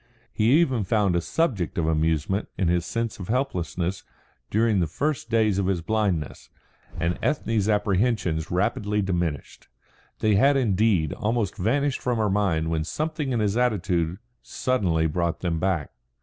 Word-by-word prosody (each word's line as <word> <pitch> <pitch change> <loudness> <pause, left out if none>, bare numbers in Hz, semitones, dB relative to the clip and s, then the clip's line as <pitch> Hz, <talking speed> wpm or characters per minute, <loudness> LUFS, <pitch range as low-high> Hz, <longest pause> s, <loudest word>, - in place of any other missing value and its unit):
He 110 +2 +2
even 130 -10 +1
found 100 -2 +1
a 85 - +2
subject 110 - -1
of 85 - +1
amusement 80 +4 0
in 90 -4 +1
his 85 -1 0
sense 115 +2 -3
of 90 - -6
helplessness 90 - -2 0.5
during 110 -1 +2
the 85 - +1
first 140 - -2
days 110 -4 +2
of 95 - 0
his 90 -4 0
blindness; 100 -8 -1 0.5
and 85 +1 -1
Ethne's 115 -8 0
apprehensions 100 -5 +1
rapidly 105 +3 0
diminished. 85 -6 -3 0.5
They 110 -1 +2
had 135 +8 +4
indeed 100 - +2
almost 110 -2 -1
vanished 135 +8 0
from 125 -2 0
her 105 -2 +1
mind 85 -6 +1
when 80 -1 0
something 150 - -3
in 120 -3 0
his 105 -1 0
attitude 90 -8 0 0.2
suddenly 95 -11 0
brought 85 +1 -1
them 85 -3 -1
back. 90 -4 -1
100 Hz, 150 wpm, -25 LUFS, 85-115 Hz, 0.5 s, had